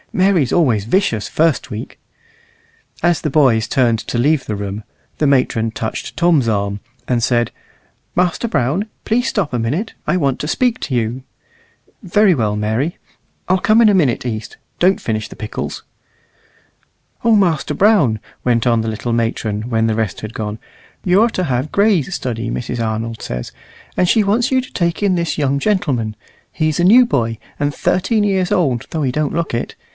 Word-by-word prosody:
Mary's 185 -8 +2
always 125 - +2
vicious 115 - 0
first 160 -2 +1
week." 105 +2 -7 1.0
As 175 -1 +2
the 155 - -1
boys 130 -7 +3
turned 120 -3 +2
to 120 - -4
leave 140 +3 +2
the 105 - -3
room, 100 +1 -5 0.4
the 150 - +3
matron 120 -5 +2
touched 110 0 -5
Tom's 165 -9 +3
arm, 100 -1 -1 0.3
and 120 -2 +1
said, 120 -1 +1 0.6
"Master 180 +6 0
Brown, 165 - 0 0.2
please 240 +3 +1
stop 185 - -1
a 120 - 0
minute; 150 - -2
I 180 - +2
want 140 -6 0
to 150 - -3
speak 250 +3 +1
to 130 - -2
you." 120 +2 -1 0.8
"Very 195 0 +3
well, 105 -5 0
Mary. 110 +10 -1 0.5
I'll 185 +1 +2
come 215 +4 +4
in 230 - +6
a 210 - +5
minute, 145 -11 +2
East. 110 -3 -5 0.2
Don't 185 +2 +3
finish 110 -2 -3
the - - -11
pickles." 105 - -5 1.4
"O 230 -1 +5
Master 175 -8 +1
Brown," 185 - +3 0.2
went 120 -1 +1
on 115 -1 +3
the 110 - -2
little 115 +2 -3
matron, 115 -1 -1
when 110 -1 +1
the 110 - 0
rest 110 -5 -2
had 110 0 -7
gone, 105 0 -4 0.5
"you're 195 +6 +4
to 185 -5 -2
have 130 +1 -1
Gray's 200 -8 +2
study, 115 -2 -3
Mrs. 120 -1 -3
Arnold 110 +1 -3
says. 60 0 -5 0.4
And 180 - +2
she 220 - +4
wants 225 +6 +1
you 260 - +3
to 255 0 -7
take 170 0 -1
in 200 -3 +2
this 170 -2 -1
young 140 -2 +1
gentleman. 140 - 0 0.3
He's 155 0 0
a - - +2
new 235 +7 +7
boy, 115 - -1 0.2
and 145 0 0
thirteen 210 +7 +1
years 190 -1 0
old 135 - +1
though 160 -2 -2
he 130 - +1
don't 150 0 -1
look 170 -4 -2
it. 115 - -3
140 Hz, 180 wpm, -18 LUFS, 115-180 Hz, 1.4 s, new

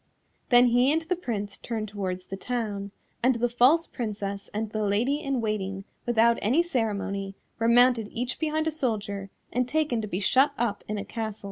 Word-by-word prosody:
Then 245 0 +7
he 245 +3 +4
and 320 +2 +1
the 355 +3 -1
Prince 210 - -4
turned 220 -2 -4
towards 185 -3 -4
the 195 - -6
town, 205 -2 -3 0.3
and 255 +1 +3
the 235 +1 +1
false 255 +8 +4
Princess 200 -4 -4
and 215 0 -3
the 215 - -2
Lady 220 +8 +1
in 275 -4 -1
Waiting, 195 -3 -2 0.2
without 235 0 +4
any 260 +12 +3
ceremony, 200 - -2 0.2
were 230 - +2
mounted 240 -2 +5
each 245 +2 -3
behind 315 0 0
a 320 - +1
soldier 210 -9 -2 0.2
and 250 0 0
taken 300 -6 +1
to 210 - -4
be 185 -2 -2
shut 265 +8 +3
up 225 -4 -1
in 210 - -2
a 200 - -4
castle. 220 0 -4
230 Hz, 190 wpm, -27 LUFS, 205-255 Hz, 0.3 s, Then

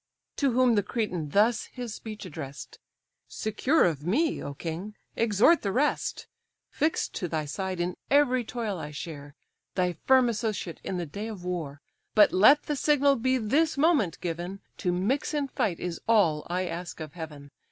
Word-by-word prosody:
To 275 -4 +2
whom 250 -1 +4
the 205 - +3
Cretan 190 -7 -3
thus 215 +7 +3
his 245 -4 -7
speech 215 -2 -8
address'd: 145 -5 -8 0.5
"Secure 255 +8 +1
of 155 -5 -1
me, 285 - +1
O 140 - -6
king! 175 +8 -5 0.2
exhort 230 - +4
the 200 - -1
rest. 285 +7 0 0.5
Fix'd 310 +2 0
to 180 - -3
thy 155 -2 -2
side, 185 +4 -4
in 175 +1 -1
every 265 -3 +4
toil 220 -5 -4
I 150 - -5
share, 145 -1 -8 0.4
Thy 180 -1 +1
firm 260 +8 +4
associate 215 -6 -3
in 185 - -3
the 175 - -2
day 200 +8 -6
of 200 -5 -7
war. 155 -6 -4 0.3
But 210 -1 +7
let 265 +11 +6
the 295 - -2
signal 285 -1 +3
be 260 +1 +1
this 285 +8 +1
moment 275 - +2
given; 175 +3 -4 0.2
To 180 - 0
mix 225 - 0
in 285 -2 -1
fight 195 -8 -1
is 175 -2 -4
all 180 -10 +3
I 180 +1 0
ask 175 +1 -6
of 155 -2 -7
Heaven. 150 -4 -9
200 Hz, 175 wpm, -27 LUFS, 170-250 Hz, 0.5 s, But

